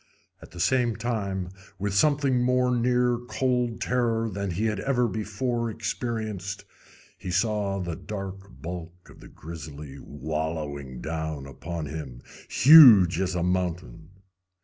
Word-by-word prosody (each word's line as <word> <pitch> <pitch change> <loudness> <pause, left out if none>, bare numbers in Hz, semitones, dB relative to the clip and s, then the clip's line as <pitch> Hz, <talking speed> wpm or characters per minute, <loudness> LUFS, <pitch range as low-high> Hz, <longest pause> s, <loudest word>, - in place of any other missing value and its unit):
At - - -12
the 85 - -11
same 120 +3 +2
time, 100 -6 -3 0.3
with 100 +2 -2
something 140 +2 +3
more 125 0 +2
near 125 0 +2
cold 125 -1 -1
terror 115 -3 0
than 100 0 -3
he 95 +6 -1
had 105 -3 -1
ever 125 +2 +1
before 115 +2 -2
experienced, 110 -3 -4 0.5
he 95 0 -6
saw 100 +1 0
the 85 -3 -4
dark 95 -1 -7
bulk 90 +1 -8
of - - -17
the - - -13
grizzly 75 -3 -9
wallowing 75 -3 -5
down 80 -3 -4
upon 80 +5 -6
him, 70 -5 -7 0.3
huge 115 - +8
as 95 -1 -1
a 85 - 0
mountain. 90 -5 -2
100 Hz, 130 wpm, -26 LUFS, 85-120 Hz, 0.5 s, huge